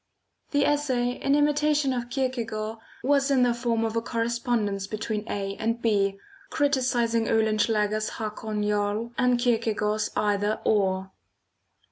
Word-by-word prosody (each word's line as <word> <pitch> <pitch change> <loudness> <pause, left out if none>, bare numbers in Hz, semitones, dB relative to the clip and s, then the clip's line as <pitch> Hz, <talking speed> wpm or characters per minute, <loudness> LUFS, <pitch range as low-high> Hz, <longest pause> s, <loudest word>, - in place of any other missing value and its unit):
The 285 -1 +2
essay, 260 -5 +1
in 275 +3 0
imitation 295 -1 +2
of 240 -1 -3
Kierkegaard, 230 -4 -2 0.2
was 280 +1 +3
in 265 -2 +4
the 245 -1 +3
form 235 -1 0
of 225 0 -3
a 230 - +1
correspondence 230 -4 -1
between 215 +1 -4
A 195 -1 -3
and 230 +1 -1
B, 200 -4 +1 0.3
criticising 250 -6 +1
Oehlenschläger's 215 -1 +1
Hakon 215 -1 -3
Jarl 210 +2 -1
and 250 -1 +3
Kierkegaard's 220 -3 0
Either 205 +1 +1
Or. 190 -2 +1
230 Hz, 125 wpm, -26 LUFS, 210-250 Hz, 0.3 s, in